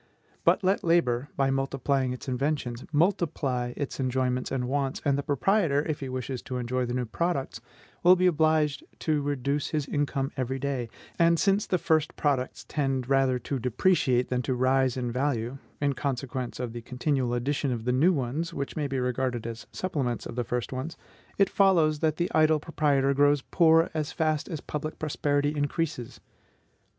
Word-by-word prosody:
But - - +3
let 190 +2 +2
labor, 145 -6 +2
by 135 -1 +2
multiplying 135 -1 0
its 125 - -7
inventions, 130 -2 -2
multiply 150 -7 +1
its 145 - -4
enjoyments 130 -1 0
and 125 -2 -1
wants, 135 0 -1
and 140 -2 +3
the 140 - 0
proprietor, 145 +1 +1
if 155 -2 -2
he 135 - -5
wishes 130 0 -4
to 130 - -5
enjoy 125 +1 -1
the 120 - -2
new 125 -1 -1
products, 135 -3 -2 0.4
will 180 +1 +7
be 185 0 +1
obliged 155 -4 +2 0.2
to 155 -2 +1
reduce 140 0 -1
his 150 -3 -1
income 140 -1 -1
every 130 0 -2
day; 135 -3 -2 0.3
and 170 0 +5
since 200 +1 +2
the 180 - +2
first 160 -2 +1
products 135 -4 -1
tend 135 -4 -1
rather 135 -2 +3
to 130 +2 -3
depreciate 125 0 +2
than 125 -1 0
to 125 +1 -1
rise 130 0 +2
in 125 -2 -2
value, 130 -1 -1 0.2
in 145 -1 +1
consequence 130 -2 -3
of 125 -3 -4
the 120 - -6
continual 125 0 -1
addition 135 +2 -1
of 115 -2 -3
the 125 - +2
new 155 +9 +4
ones, 145 +2 -2
which 140 -1 -4
may 150 -2 -1
be 135 -1 -2
regarded 125 -2 -1
as 115 0 -6
supplements 140 -10 -2
of - - -7
the 125 - 0
first 120 +2 -3
ones, 130 +6 -5 0.4
it 195 - +5
follows 170 -7 +3
that 155 -1 +1
the 175 +1 -1
idle 155 0 +4
proprietor 140 -3 +1
grows 145 0 +3
poor 165 -2 +5
as 155 0 -2
fast 155 -2 0
as 155 - -4
public 155 +1 -5
prosperity 145 -1 0
increases. 145 -5 -2
140 Hz, 180 wpm, -27 LUFS, 125-155 Hz, 0.4 s, will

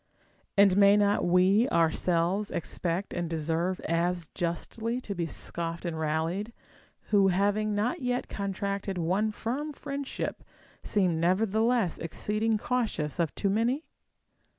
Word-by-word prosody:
And 195 -1 +6
may 200 0 +7
not 205 0 +2
we 185 +7 +4
ourselves 170 +4 +1
expect 175 +3 -3
and 175 -1 -2
deserve 165 +3 -1
as 170 0 -1
justly 220 +7 -2
to 210 -5 -5
be 170 -3 -2
scoffed 170 +1 -4
and 170 -2 -2
rallied, 165 +8 -1 0.6
who 200 -2 +5
having 205 +3 +1
not 245 +10 0
yet 250 -1 -1
con 200 -1 -3
tracted 200 0 -3
one 185 +6 +1
firm 260 +8 -3
friendship 280 -1 -5 0.4
seem 180 -6 +1
nevertheless 215 +3 +2
exceeding 215 +6 -1
cautious 210 - -2
of 165 -3 0
too 200 - 0
many 240 +9 +1
195 Hz, 130 wpm, -28 LUFS, 170-220 Hz, 0.6 s, may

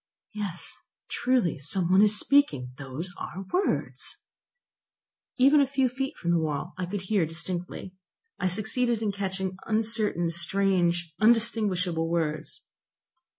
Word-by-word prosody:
"Yes, 200 -5 -4 0.4
truly, 245 - +1
some 175 +5 -1
one 190 +2 +6
is 210 0 +6
speaking; 265 - +2
those 145 +7 -5
are 190 +2 -6
words!" 380 +2 0 1.2
Even 280 +3 +6
a 275 - +3
few 265 -1 +2
feet 270 +2 -4
from 170 - -1
the 170 - +3
wall 150 -3 -3
I 185 -1 -4
could 200 +1 -3
hear 190 0 +1
distinctly. 175 +2 -5 0.5
I - - +1
succeeded 220 +4 0
in 210 - +1
catching 190 -1 -3
uncertain, 215 -6 +1
strange, 175 -2 +1
undistinguishable 205 -7 +2
words. 160 -3 -2
190 Hz, 125 wpm, -27 LUFS, 170-220 Hz, 1.2 s, one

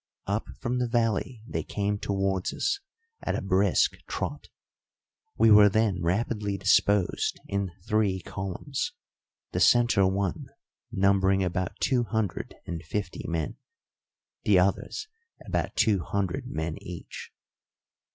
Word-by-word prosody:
Up 100 +3 -1
from 125 0 -1
the 125 - +1
valley 115 0 0
they - - -2
came 100 0 -2
towards 95 -2 -1
us 400 - 0 0.4
at - - -1
a - - -2
brisk - - +3
trot. - - -4 0.9
We 110 - +6
were 105 -1 +9
then 105 -3 +1
rapidly 105 +3 0
disposed 100 0 +2
in 100 -1 -1
three 105 -4 +1
columns, 95 +8 -4 0.6
the - - -1
centre 120 -5 +5
one 95 -1 -1 0.4
numbering 95 0 +3
about 90 0 -2
two 125 -3 +2
hundred 110 -5 -2
and 85 -2 -4
fifty 90 +2 -4
men, 80 -3 -2 0.8
the 100 -3 +4
others 100 - 0 0.4
about - - -2
two 105 -3 +3
hundred 95 +1 -2
men 80 +1 -3
each. 90 -2 -8
100 Hz, 120 wpm, -27 LUFS, 95-110 Hz, 0.9 s, were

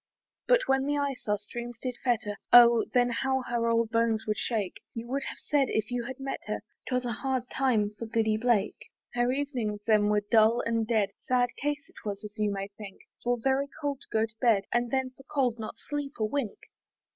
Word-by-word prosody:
But - - +5
when 270 0 +2
the 290 0 +1
ice 280 -4 -2
our 210 0 +2
streams 240 +4 -7
did 250 0 -3
fetter, 235 -4 0 0.2
Oh! 235 -1 +8
then 245 -1 +3
how 265 +2 0
her 235 -1 -1
old 230 -1 +2
bones 230 -1 +1
would 210 -1 -1
shake! 210 -6 -2
You 230 0 -4
would 275 +2 -1
have - - -8
said, 290 -2 +1
if 220 +2 -1
you 245 -1 -2
had 260 +2 -7
met 270 0 -3
her, 215 - -2 0.3
'Twas 250 -1 0
a 240 - -1
hard 255 +2 -2
time 230 -6 +2
for 230 - -4
Goody 220 -1 +1
Blake. 220 -2 0 0.2
Her 240 +1 +2
evenings 255 -7 -2
then 210 -2 +4
were 210 0 +3
dull 225 +1 +5
and 230 -1 0
dead; 215 -4 +2
Sad 250 -1 +1
case 290 0 -2
it - - -16
was, 205 -1 -4
as 210 0 -8
you 210 -1 +2
may 195 0 -4
think, 200 -1 -11 0.2
For 245 0 +1
very 270 +3 +1
cold 285 -2 -2
to - - -12
go 220 0 +2
to 220 -1 -13
bed, 225 -5 +4
And 240 0 +1
then 265 0 0
for 255 - -17
cold 260 -6 0
not 215 - -6
sleep 290 -1 -4
a 215 - +1
wink. 240 -2 -2
235 Hz, 215 wpm, -29 LUFS, 215-265 Hz, 0.3 s, Oh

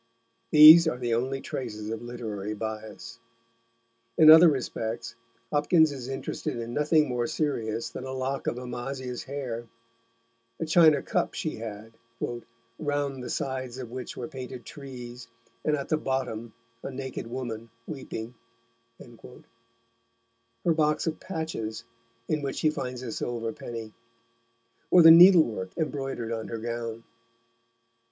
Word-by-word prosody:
These 155 +2 +10
are 140 - 0
the 120 -2 -1
only 130 +3 -1
traces 110 -4 -5
of 115 0 -4
literary 110 -4 -5
bias. 110 +1 -7 1.0
In 155 -1 +9
other 160 +2 +9
respects 120 -5 -3 0.4
Hopkins 155 +1 +4
is 130 -3 -7
interested 135 -2 -4
in 115 0 -5
nothing 150 +2 +3
more 120 -2 -1
serious 115 -8 -2
than - - -7
a 130 - -5
lock 130 +1 -3
of - - -1
Amasia's 125 0 -5
hair; 125 -4 -5 0.9
the 165 - -3
china 160 -2 +5
cup - - -1
she - - -3
had, 110 0 -8 0.9
"round 145 -3 -2
the - - -6
sides 130 -2 -3
of 125 -3 -7
which 125 0 -7
were 120 - -4
painted 130 -1 -8
Trees, 125 -4 -9 0.4
and 150 - +2
at 140 -2 -5
the 155 - +2
bottom 125 -6 -3 0.3
a - - -5
Naked 130 -3 -6
Woman 115 -2 -6 0.2
Weeping;" 125 -5 -7 0.6
her 115 +2 -9
box 150 -1 +1
of 160 -1 -2
patches, 160 - -5 0.4
in 155 -1 0
which 140 -1 -3
she 155 - +2
finds 125 -3 -5
a 120 - -5
silver 115 -1 -3
penny; 115 -2 -8 1.0
or 180 - +7
the 165 - +11
needlework 165 - +6
embroidered 135 -7 -3
on 110 -1 -4
her 115 - -4
gown. 115 0 -5
125 Hz, 135 wpm, -27 LUFS, 115-145 Hz, 1.0 s, the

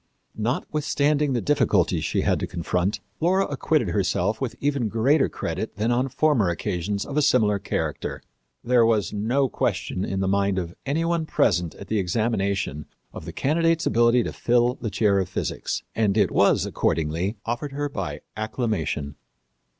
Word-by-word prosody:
Notwithstanding 145 +4 0
the 120 - 0
difficulties 145 0 +2
she - - 0
had - - +1
to - - -3
confront, 90 +3 -1 0.2
Laura 185 +4 +2
acquitted 145 - 0
herself 100 +3 0
with 130 -3 -2
even 140 -5 0
greater 135 +7 +3
credit 95 +7 -4
than 110 +4 0
on 125 +3 +1
former 135 - +2
occasions 90 +4 -2
of 145 - -5
a - - +4
similar 110 -8 +3
character. - - -3 0.4
There 120 0 +4
was 110 -3 +1
no 120 +7 +1
question 95 -5 -2
in 95 - -2
the 95 - 0
mind 100 0 +1
of 85 -2 -3
any 160 +4 0
one 165 -2 0
present 85 - +1
at 100 - -10
the 110 +1 0
examination 100 - -1 0.3
of - - -8
the 85 - -6
candidate's 165 - +1
ability 120 +2 +4
to - - -4
fill 120 0 +2
the 120 -3 -5
chair 100 0 +2
of 95 -1 -2
physics, - - -3
and 105 -2 +1
it 100 -4 +3
was, - - +3
accordingly, 85 +7 -1
offered 120 +5 -2
to 135 - -11
her 145 0 -1
by 90 - -5
acclamation. 105 - -2
110 Hz, 165 wpm, -24 LUFS, 95-135 Hz, 0.4 s, a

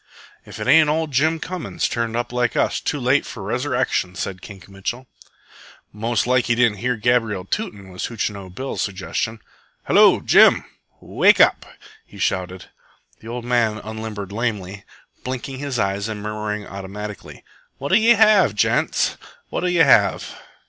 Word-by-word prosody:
"If - - -10
it - - -4
ain't 160 -1 +5
ol' 160 +2 +1
Jim 155 +3 +1
Cummings, 180 +1 -3
turned 115 -1 -2
up 120 +1 -3
like 125 -1 0
us, - - +1
too 145 - -3
late 130 +3 +2
for 105 - -8
Resurrection!" 125 -4 -1
said 95 -1 -5
Kink 95 -3 -12
Mitchell. 100 +6 -5 0.9
"Most 110 0 -1
like 125 0 +2
he 120 - +1
didn't 115 -4 +2
hear 125 +2 0
Gabriel 110 -4 0
tootin'," 100 - -4
was 90 0 -5
Hootchinoo 100 -4 -4
Bill's 130 +9 -5
suggestion. 105 +3 -3 0.4
"Hello, - - +5
Jim! - - +5 0.3
Wake - - +3
up!" - - +4 0.4
he - - -16
shouted. 95 0 -2 0.5
The 110 - -13
old 120 +1 -6
man 120 -3 +1
unlimbered 110 -2 -7
lamely, 105 -3 -4 0.4
blinking 130 +1 -5
his 140 -3 -3
eyes 100 -1 -1
and 110 -1 -5
murmuring 105 -1 -4
automatically: 100 +2 -8 0.3
"What'll 145 - +2
ye 230 +2 +5
have, 210 - +4
gents? 105 - +1 0.3
What'll 180 - -1
ye 175 -2 +4
have?" - - +4
115 Hz, 150 wpm, -21 LUFS, 100-130 Hz, 0.9 s, ain't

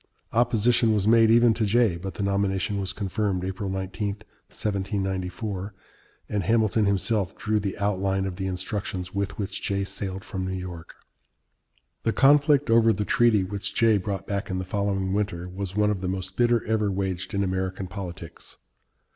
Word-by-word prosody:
Opposition 115 -1 +3
was 105 -1 +1
made 115 0 +6
even 120 0 +6
to 110 - -1
Jay, 110 -2 +3
but 90 +1 -6
the 100 - -3
nomination 100 0 0
was 95 -1 -2
confirmed 95 -1 -2
(April 95 +1 -3
19, 95 +2 -3 0.4
1794), 95 0 -3 0.5
and 105 -1 -1
Hamilton 110 +1 +2
himself 100 0 0
drew 110 0 0
the 100 -1 -3
outline 95 -1 0
of 95 -2 -4
the 95 -1 -2
instructions 95 -1 -4
with 100 0 -2
which 100 -1 -3
Jay 100 0 -1
sailed 95 0 -4
from 95 -3 -4
New 95 0 -3
York. 90 -3 -8 1.1
The 115 - 0
conflict 145 -1 +4
over 115 0 +6
the 105 0 -1
treaty 115 -4 +3
which 100 +1 -4
Jay 110 -3 +4
brought 95 0 -4
back 100 +2 -3
in 95 - -2
the 90 - -3
following 95 0 -1
winter 100 -4 -2
was 95 +1 -5
one 105 0 +3
of 100 -3 -3
the 95 - -2
most 95 0 -4
bitter 120 -1 +2
ever 110 -2 +1
waged 95 -1 -3
in 100 - +1
American 95 0 -2
politics. 90 -2 -8
100 Hz, 170 wpm, -26 LUFS, 95-110 Hz, 1.1 s, made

